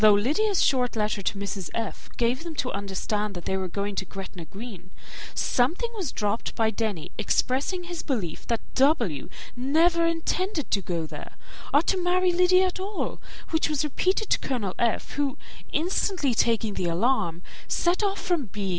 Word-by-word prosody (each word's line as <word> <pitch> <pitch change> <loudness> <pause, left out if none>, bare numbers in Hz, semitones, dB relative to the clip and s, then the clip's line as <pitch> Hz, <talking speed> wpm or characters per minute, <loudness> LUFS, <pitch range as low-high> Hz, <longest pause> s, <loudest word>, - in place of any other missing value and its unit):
Though 215 -1 +8
Lydia's 340 - +2
short 250 -3 +2
letter 210 -1 0
to 200 - -1
Mrs. 195 -2 -4
F. 225 -3 -4
gave 245 +5 +1
them 335 -2 -6
to 255 -2 -1
understand 200 +1 -2
that 175 - -7
they 190 - 0
were 190 -1 -1
going 200 +3 -2
to - - +1
Gretna 190 -3 -7
Green, 195 +1 -9 0.5
something 340 - +1
was 370 -10 -2
dropped 210 +2 -1
by 220 -1 +2
Denny 205 -7 -2
expressing 270 - +1
his 345 -1 -5
belief 210 - -3
that 230 -1 0
W. 240 - +2 0.3
never 325 +7 +3
intended 335 0 -1
to 200 - +3
go 170 -3 -2
there, - - -9 0.4
or 290 +3 +5
to 375 +1 +1
marry 360 +1 +3
Lydia 365 +1 +5
at 370 0 -2
all, 395 +2 -3 0.3
which 320 -1 +2
was 300 -1 +1
repeated 370 +8 0
to - - +4
Colonel 220 -8 -2
F., 235 -2 +1
who, 285 -2 -1 0.3
instantly 345 - +1
taking 225 -1 +2
the 180 - -1
alarm, 175 -2 +1 0.2
set 350 +3 +2
off 400 -1 0
from 345 -7 0
B. 200 -1 -4
250 Hz, 170 wpm, -26 LUFS, -, 0.5 s, Though